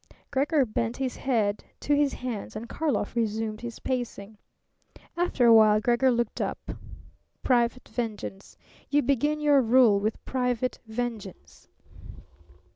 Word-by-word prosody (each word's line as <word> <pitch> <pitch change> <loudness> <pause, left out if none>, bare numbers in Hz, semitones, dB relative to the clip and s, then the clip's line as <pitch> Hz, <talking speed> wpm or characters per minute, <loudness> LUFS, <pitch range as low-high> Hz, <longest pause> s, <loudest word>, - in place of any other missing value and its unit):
Gregor 285 +1 +2
bent 230 +1 -2
his 260 -2 -2
head 215 -6 0 0.2
to 290 - 0
his 285 -1 +2
hands 240 -6 -5
and 220 +2 -6
Karlov 265 -7 -2
resumed 220 -1 -2
his 235 -1 -6
pacing. 235 -5 -4 0.8
After 345 -7 +1
a 230 - +8
while 215 -1 +6
Gregor 240 +4 +2
looked 235 -2 -1
up. - - -4 0.7
"Private 245 0 +1
vengeance. 215 -4 -6 0.3
You 290 0 +2
begin 285 +4 +1
your 290 -2 +4
rule 230 -3 +5
with 215 +2 -3
private 250 -1 -1
vengeance." 220 - -6
240 Hz, 125 wpm, -27 LUFS, 220-265 Hz, 0.8 s, a